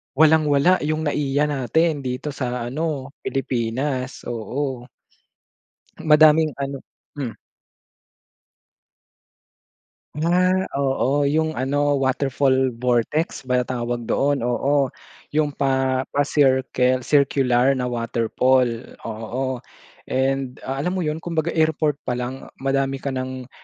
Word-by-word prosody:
walang-wala 155 +2 +4
yung 155 0 -1
NAIA 145 -1 0
natin 145 +3 +1
dito 130 +3 -4
sa 125 -3 -3
ano, 145 -2 -3
Pilipinas, 130 +1 -2
oo. 125 +2 -4 1.1
Madaming 155 0 +6
ano 140 0 -3 0.4
hmm. 130 -5 -3 2.9
Ah, 185 +3 +2
oo, 140 +1 +1
yung 155 +2 0
ano, 145 +2 +1
waterfall 135 0 +1
vortex 125 +6 0
ba 125 -1 0
tawag 120 -1 -3
doon, 140 +2 +1
oo. 135 +3 +2 0.5
Yung 150 -1 +2
pa 130 -2 0
pa-cirlcle, 130 -3 +2
circular 135 -2 +3
na 125 -1 -2
waterfall, 120 +1 0
oo. 120 +4 -3 0.5
And, 135 0 -1
ah, 135 +1 -4
alam 180 +7 -1
mo 185 - -1
yun, 155 -1 -1
kumbaga 165 -1 -2
airport 155 -2 +2
pa - - -1
lang 125 +2 -5 0.2
madami 135 0 0
ka 140 - -2
ng, 130 -1 -5
135 Hz, 105 wpm, -22 LUFS, 125-150 Hz, 2.9 s, Madaming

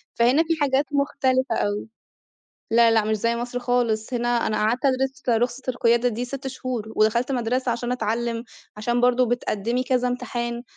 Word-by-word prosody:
فهنا 250 +7 +4
في 330 0 0
حاجات 275 0 +2
مختلفة 260 -3 +1
أوي. 205 +1 -1 0.9
لا 230 0 +6
لأ 220 -1 +3
مش 215 0 0
زي 230 +3 0
مصر 245 +1 -3
خالص، 245 -2 0
هنا 240 0 0 0.2
أنا 215 - -1
قعدت 225 +5 0
أدرس 265 0 0 0.2
رخصة 245 +2 -2
القيادة 240 -1 +2
دي 240 +1 -3
6 270 +2 -6
شهور 250 -4 -4
ودخلت 235 +5 +2
مدرسة 250 0 0
عشان 240 +1 -3
أتعلم، 230 0 -2 0.3
عشان 240 +3 0
برضو 250 +1 +3
بتقدمي 235 0 -1
كذا 250 -1 +1
امتحان، 240 -1 -3
245 Hz, 160 wpm, -23 LUFS, 230-255 Hz, 0.9 s, لا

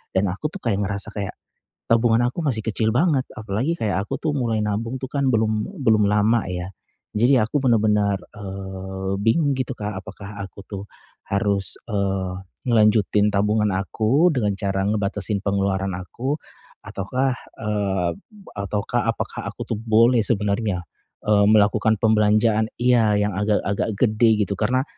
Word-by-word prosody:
Dan 95 +1 +3
aku 150 +10 -3
tuh - - -4
kayak 105 -4 0
ngerasa 100 +1 -2
kayak 100 -2 -4 0.5
tabungan 115 +1 +4
aku 150 +7 -3
masih 115 -6 -1
kecil 110 0 0
banget, 150 -2 +3 0.2
apalagi 110 +11 -2
kayak 100 -4 0
aku 135 - -3
tuh 155 -2 0
mulai 120 -5 0
nabung 115 +5 -2
tuh - - -2
kan 140 -2 0
belum 110 - 0
belum 110 -4 +4
lama 105 +2 +3
ya. 90 0 -4 0.5
Jadi 125 +5 +4
aku 130 +6 0
bener-bener, 105 -4 +3 0.2
eee, 95 -1 -5
bingung 140 +6 +2
gitu 130 0 -2
Kak, 105 0 -4
apakah 100 0 -10
aku 100 +1 -8
tuh 100 -1 -6 0.5
harus, 100 -1 0
eee, 95 -3 -1 0.3
ngelanjutin 105 -2 +4
tabungan 105 +1 +2
aku 115 - +2
dengan 105 -6 0
cara 95 -1 -1
ngebatasin 105 0 -1
pengeluaran 100 -1 0
aku 125 +9 -3 0.5
ataukah, 130 +7 -1 0.2
eee, 100 -5 0 0.5
ataukah 100 +1 -1
apakah - - -3
aku - - -7
tuh 115 - -2
boleh 115 +1 +4
sebenarnya, 100 -3 0 0.4
eee, 105 -1 +4
melakukan 110 +1 +4
pembelanjaan 110 0 +3 0.2
iya, 120 -4 +4
yang 105 0 +1
agak-agak 105 0 0
gede 110 -2 +3
gitu, 100 - -2
karena 130 +4 +2
105 Hz, 145 wpm, -22 LUFS, 100-115 Hz, 0.5 s, tabungan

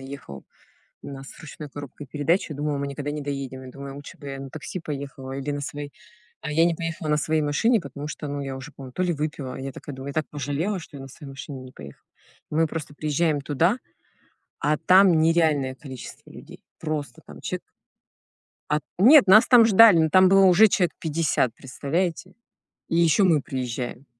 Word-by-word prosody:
ехал. 135 - -9 0.6
У - - -8
нас 135 -1 -9
с - - -15
ручной 155 -1 -9
коробкой 145 0 -9
передач. 155 +7 0
Я 150 - -5
думала, 145 0 -1
мы 140 - -2
никогда 140 +1 -5
не 150 0 -4
доедем. 135 -2 -5
Я 130 - -9
думаю, 140 +1 -9
лучше 145 0 -11
бы 145 - -9
я 135 0 -6
на 135 -1 -8
такси, 155 +5 -6
поехала 140 -3 -6
или 140 +2 -4
на 145 0 -3
своей. 145 0 -6 0.5
А 150 - -4
я 165 +2 +4
не 170 -1 +2
поехала 165 -1 -4
на 150 - +3
своей 155 +1 0
машине, 205 - +2
потому 140 0 -8
что, 150 0 -6
ну, 145 0 -4
я 135 -1 -5
уже, 140 +3 -9
по-моему, 130 -2 -11
то 180 - -2
ли 180 -1 +1
выпила. 150 -3 -4
А - - -7
я 135 0 -5
такая 145 - -9
думаю: 135 +1 -8
"Я - - -10
так 155 -2 -1
пожалела, 150 +8 -2
что 150 -4 -11
я - - -9
на 135 - -9
своей 145 +2 -12
машине 135 -1 -8
не 130 0 -12
поехала". 70 -2 -13 0.4
Мы 160 +2 +2
просто 155 -2 -6
приезжаем 155 0 0
туда, 160 - +1 0.8
а 150 +1 +1
там 185 0 +5
нереальное 155 -5 +2
количество 130 -2 -10
людей, - - -13 0.2
просто 150 -6 -4
там - - -12
чек - - -4 1.1
А 150 - +2
т - - -43
нет, 260 +4 +8
нас 205 +4 +7
там 245 -3 +8
ждали, 215 -4 +7
но 160 0 +3
там 185 +3 +6
было 195 +1 +6
уже 190 +4 +7
человек 180 -3 +1
50, 155 -7 0
представляете? 165 +8 -3 0.5
И 165 - 0
ещё 170 +4 +4
мы 160 -6 +3
приезжаем. 125 0 -5
145 Hz, 205 wpm, -24 LUFS, 135-165 Hz, 1.1 s, нет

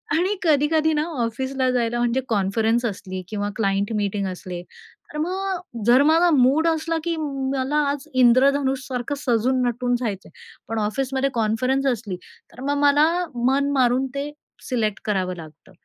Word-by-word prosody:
आणि 370 +5 +1
कधी-कधी 310 +1 +3
ना 300 0 +1 0.2
ऑफिसला 260 +3 -1
जायला, 240 -1 0
म्हणजे 240 +2 +1
कॉन्फरन्स 225 +3 +1
असली 190 -3 -4
किंवा 205 -1 -2
क्लायंट 200 -1 0
मीटिंग 200 -1 -1
असले, 180 -1 -6 0.5
तर 300 - -5
मग 360 - -3
जर 245 +3 +6
माझा 330 +3 +4
मूड 280 +5 +4
असला, 325 0 0
की 340 -1 -1
मला 275 -1 -2
आज 285 +1 -6
इंद्रधनुष 265 +2 +3
सारखं 255 +2 -3
सजून-नटून 245 -1 +1
जायचं 205 -6 -4
आहे, - - -22 0.3
पण 225 0 -2
ऑफिसमध्ये 265 +5 -1
कॉन्फरन्स 240 +5 0
असली, 215 -6 -4 0.4
तर 250 - -12
मग 285 - +1
मला 290 +2 +5 0.4
मन 280 +2 +2
मारून 255 0 +2
ते 285 +1 -3 0.4
सिलेक्ट 220 -5 -1
करावं 185 -3 -1
लागतं 155 -2 -13
255 Hz, 150 wpm, -23 LUFS, 220-285 Hz, 0.5 s, जर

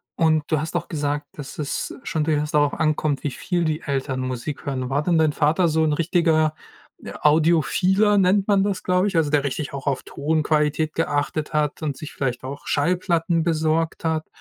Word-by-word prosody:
Und 160 -2 +2
du 155 - +3
hast 160 +3 -5
auch 175 - -2
gesagt, 145 -2 -2
dass 145 -1 -8
es 145 - -3
schon 155 - -1
durchaus 150 -1 0
darauf 145 -1 +2
ankommt, 155 -2 0
wie 145 - -1
viel 175 +4 -2
die 155 +1 -1
Eltern 135 -2 -2
Musik 130 +2 -5
hören. 130 -2 -2
War 140 +2 +1
denn 170 -1 +2
dein 155 -2 +3
Vater 160 +5 +2
so 160 0 +2
'n 155 - +2
richtiger, 160 -1 +2 0.5
äh, - - -7
Audiophiler 170 +6 +3
nennt 190 +1 +3
man 200 -2 +3
das, 195 -2 -2
glaub 180 +1 +2
ich, 190 - -1
also 155 -2 +2
der 145 -2 +3
richtig 140 +1 -3
auch 140 0 -6
auf 135 - 0
Tonqualität 155 0 0
geachtet 150 -1 -1
hat 150 0 0
und 145 -4 -3
sich 155 - -8
vielleicht 125 -3 -2 0.2
Schallplatten 170 +1 +1
besorgt 160 0 0
hat? 160 -1 -1
155 Hz, 185 wpm, -23 LUFS, 145-165 Hz, 0.5 s, du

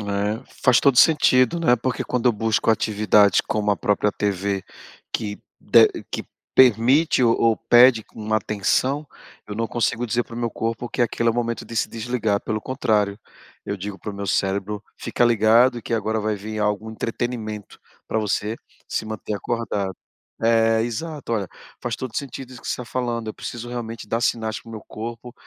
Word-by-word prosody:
É, 105 +2 -2 0.2
faz 125 -2 +5
todo 135 -3 +4
sentido, 150 0 +5
né, 125 -7 +4
porque 125 0 -2
quando 125 -1 -1
eu - - +3
busco 110 +1 0
atividades, 105 -2 +4
como 105 -1 -1
a 100 - +2
própria 105 0 +1
TV 100 -1 -2 0.5
que 105 -2 -3 0.2
de - - +6 0.2
que - - -4 0.3
permite 130 +5 +4
ou 115 -2 +4
ou 115 -1 +4
pede 120 -2 +5
uma 110 0 -1
atenção, 110 +8 0 0.4
eu 105 - -6
não 115 +1 -2
consigo 120 0 0
dizer 120 +1 0
para 115 - -11
o - - -5
meu 120 -1 -1
corpo 115 +2 -3
que 125 - -5
aquele 115 -1 +1
é - - +5
o - - -8
momento 115 -1 -2
de 115 - -8
se - - +1
desligar, 110 -3 -1
pelo 110 0 -3
contrário. 105 -6 0 0.5
Eu 100 - -3
digo 100 +1 -6
para 105 - -6
o - - -8
meu 100 0 -5
cérebro: 100 +2 -1
"Fica 120 - 0
ligado 120 +2 +4
que 115 - -3
agora 110 0 -1
vai 110 0 -1
vir 110 +2 -6
algum 105 +1 -1
entretenimento 110 -2 -4 0.3
pra 110 - 0
você 105 +1 -1 0.3
se - - -2
manter 110 -1 -5
acordado". 100 -3 -2 0.5
É, 115 0 +3
exato, 135 +4 -4
olha. 105 -4 0 0.3
Faz 120 -2 -2
todo 130 - -5
o - - -7
sentido 135 -2 -5
isso 120 - -11
que - - -12
você - - 0
tá 125 - -6
falando. 120 -2 -3
Eu 110 - -5
preciso 120 0 -7
realmente 115 -3 -6
dar 115 +2 0
sinais 110 -2 -1
para - - -16
o - - -9
meu 110 - -7
corpo 115 +2 -7
115 Hz, 190 wpm, -23 LUFS, 105-120 Hz, 0.5 s, de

